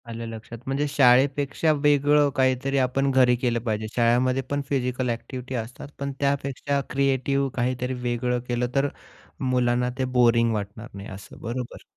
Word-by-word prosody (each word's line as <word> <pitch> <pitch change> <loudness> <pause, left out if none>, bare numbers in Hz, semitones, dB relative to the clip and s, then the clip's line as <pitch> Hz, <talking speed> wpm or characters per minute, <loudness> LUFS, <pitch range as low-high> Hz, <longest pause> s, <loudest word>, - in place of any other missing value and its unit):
आलं 115 0 -5
लक्षात. 115 +1 -8
म्हणजे 135 +2 0
शाळेपेक्षा 140 +3 +3
वेगळं 145 0 +3
काहीतरी 130 +1 +1
आपण 135 +1 +1
घरी 130 -2 +4
केलं 120 -1 0
पाहिजे. 110 -2 -2
शाळेमध्ये 125 +2 +2
पण 145 0 -1
फिजिकल 125 -2 -1
ॲक्टिव्हिटी 125 +2 -5
असतात 120 +3 -6
पण 140 0 -3
त्यापेक्षा 140 0 -1
क्रिएटिव्ह 135 +1 +1
काहीतरी 125 +1 -1
वेगळं 125 0 -1
केलं 120 0 0
तर 140 +1 +3 0.6
मुलांना 125 0 +2
ते 130 - 0
बोरिंग 115 -1 +4
वाटणार 105 +2 -5
नाही 100 0 -8
असं 95 0 -11
बरोबर? 120 +1 -5
125 Hz, 145 wpm, -25 LUFS, 120-140 Hz, 0.6 s, घरी